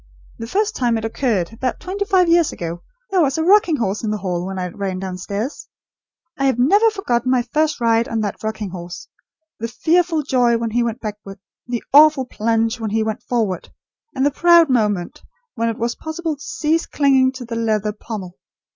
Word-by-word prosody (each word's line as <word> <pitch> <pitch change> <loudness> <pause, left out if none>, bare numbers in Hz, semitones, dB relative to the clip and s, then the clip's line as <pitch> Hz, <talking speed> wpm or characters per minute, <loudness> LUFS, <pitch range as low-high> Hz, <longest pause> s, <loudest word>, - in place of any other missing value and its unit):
The 230 - -5
first 420 - 0
time 240 -3 +1
it 220 - -4
occurred, 225 -5 -1
about 255 +2 -3
twenty 395 +3 -3
five 375 -4 +3
years 335 -1 +4
ago, 170 0 -6 0.3
there 375 -2 +3
was 280 -2 +1
a 320 - 0
rocking 375 -2 +4
horse 210 -5 -2
in 220 - -1
the 215 - -1
hall, 180 -2 -3
when 190 0 -5
I 180 -1 -3
ran 190 0 -4
downstairs! 195 +6 -5 0.7
I 275 - +1
have 265 -3 +2
never 405 - +4
forgotten 255 - -1
my 255 -1 +2
first 310 +3 0
ride 230 0 +2
on 225 -1 -2
that 205 -2 -4
rocking 215 -3 -4
horse. 175 -1 -8 0.5
The 230 - -2
fearful 320 +6 +1
joy 245 -4 +2
when 230 -1 -3
he 240 +2 +1
went 235 +1 -2
backward; 210 -2 -7 0.3
the 240 -2 -3
awful 295 -2 +7
plunge 225 0 0
when 220 -1 -3
he 220 +1 0
went 220 -1 -3
forward; 215 -8 -2 0.5
and 265 0 +1
the 290 - +3
proud 340 0 +5
moment 210 -7 0 0.3
when 230 -1 -1
it 225 - -4
was 235 +1 -1
possible 315 0 -4
to 285 - -20
cease 315 +2 -1
clinging 265 -2 +3
to 255 -2 -8
the 230 0 -5
leather 215 -2 0
pommel. 205 -4 -8
235 Hz, 200 wpm, -20 LUFS, 215-300 Hz, 0.7 s, awful